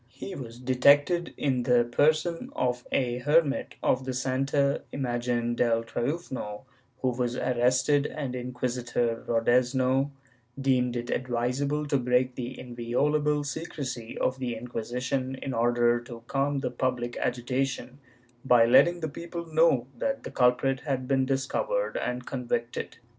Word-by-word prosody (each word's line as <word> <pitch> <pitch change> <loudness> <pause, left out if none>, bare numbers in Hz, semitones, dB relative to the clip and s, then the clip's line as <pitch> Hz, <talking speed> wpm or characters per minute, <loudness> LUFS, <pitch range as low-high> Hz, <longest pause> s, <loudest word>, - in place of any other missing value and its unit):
He 195 - -8
was 120 -7 -8
detected, 140 +7 +3
in 130 -3 +1
the 120 0 +4
person 155 - +1
of 125 -1 -1
a 125 -2 0
hermit 145 +1 +2
of 130 - +2
the 130 -1 -3
Santa 135 +2 +1
Imagen 120 -2 -1
del 115 -1 +2
Triunfo, 120 -4 -4 0.4
w^ho 125 -2 +1
was 120 0 0
arrested, 125 +4 +2
and 140 -4 -4
Inquisitor 125 -2 -2
Rodezno 125 +3 +2 0.5
deemed 125 -2 +2
it 120 0 -3
advisable 130 +4 -1
to 140 -1 +1
break 125 +1 +2
the 125 0 -6
inviolable 145 +5 0
secrecy 140 -6 -5
of 130 +1 0
the 125 -3 -2
Inquisition 125 +3 -3
in 130 0 -5
order 120 0 +3
to 120 -1 -10
calm 140 +2 0
the 125 -2 -2
public 120 -1 -2
agitation, 125 +2 -2 0.4
by 125 -3 +6
letting 170 +8 +5
the 160 - -1
people 170 +3 -6
know 155 -6 +4
that 275 - -2
the - - -7
culprit 125 +1 +2
had 130 -3 -3
been 135 -1 +2
discovered 140 - -1
and 125 0 -2
convicted. 120 -2 -3
125 Hz, 135 wpm, -28 LUFS, 120-140 Hz, 0.5 s, by